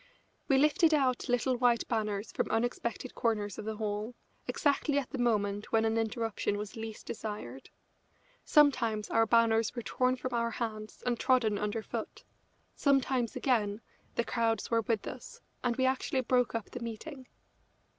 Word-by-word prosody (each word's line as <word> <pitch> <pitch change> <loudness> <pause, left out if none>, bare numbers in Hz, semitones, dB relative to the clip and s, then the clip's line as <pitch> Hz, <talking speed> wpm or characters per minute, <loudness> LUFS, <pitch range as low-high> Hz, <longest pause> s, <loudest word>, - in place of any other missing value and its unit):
We 270 - +4
lifted 305 +3 +4
out 255 -4 +1
little 245 +1 +2
white 240 -2 +2
banners 215 -2 -2
from - - -1
unexpected 235 +2 -2
corners 210 -4 -1
of 215 - -6
the 220 0 -3
hall, 215 +2 -3 0.3
exactly 285 -1 +1
at 275 -4 -2
the 270 - -4
moment 205 -4 0
when 225 0 +3
an 225 0 +1
interruption 225 -2 -1
was 210 +3 -6
least 225 -1 -7
desired. 205 - -6 0.7
Sometimes 235 -8 +3
our 225 0 +4
banners 230 0 +3
were 240 - -4
torn 255 +2 +1
from 255 0 -5
our 235 0 +1
hands 215 -2 -5
and 240 -1 0
trodden 245 -6 +2
under 210 +1 -2
foot. - - -6 0.5
Sometimes, 265 -4 +2
again, 220 -6 +1 0.4
the 235 - +1
crowds 230 -1 0
were 230 0 +3
with 225 -2 -1
us, 250 - -8 0.2
and 240 -1 +1
we 260 - +1
actually 260 0 +1
broke 250 -1 +1
up 225 - -4
the 250 - -5
meeting. 245 +4 -7
230 Hz, 160 wpm, -31 LUFS, 215-255 Hz, 0.7 s, We